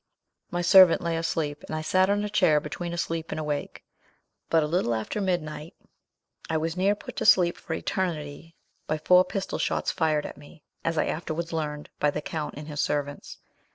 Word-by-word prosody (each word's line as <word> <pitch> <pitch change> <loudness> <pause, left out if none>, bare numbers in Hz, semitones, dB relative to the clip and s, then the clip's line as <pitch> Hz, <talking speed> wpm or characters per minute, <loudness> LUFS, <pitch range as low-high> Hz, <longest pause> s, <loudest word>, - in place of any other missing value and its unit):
"My 175 0 -2
servant 185 -1 +7
lay 170 -1 0
asleep, 160 -3 -2
and - - -4
I 155 - -3
sat 185 +4 +3
on 205 +1 +1
a - - -1
chair 180 -8 +3
between 170 +4 -5
asleep 165 -1 -3
and - - -3
awake; 150 -2 -4 0.7
but 165 -1 +4
a - - +1
little 150 -7 0
after 110 - -3
midnight, 165 -4 -3 0.7
I 160 - +1
was 165 +1 -2
near 195 +3 +2
put - - -10
to - - -1
sleep 175 -4 +6
for - - -5
eternity 165 -3 -3 0.3
by 155 - 0
four 180 +4 +5
pistol 195 +1 -4
shots - - 0
fired 155 -2 +1
at - - -7
me, 145 +1 -16 0.2
as 165 -1 -1
I - - +2
afterwards 165 +1 -3
learned, 150 -2 -4
by 150 - +3
the - - -2
count 150 0 -5
and 150 0 -8
his 150 -2 -6
servants. 145 -1 -3
165 Hz, 190 wpm, -26 LUFS, 150-175 Hz, 0.7 s, servant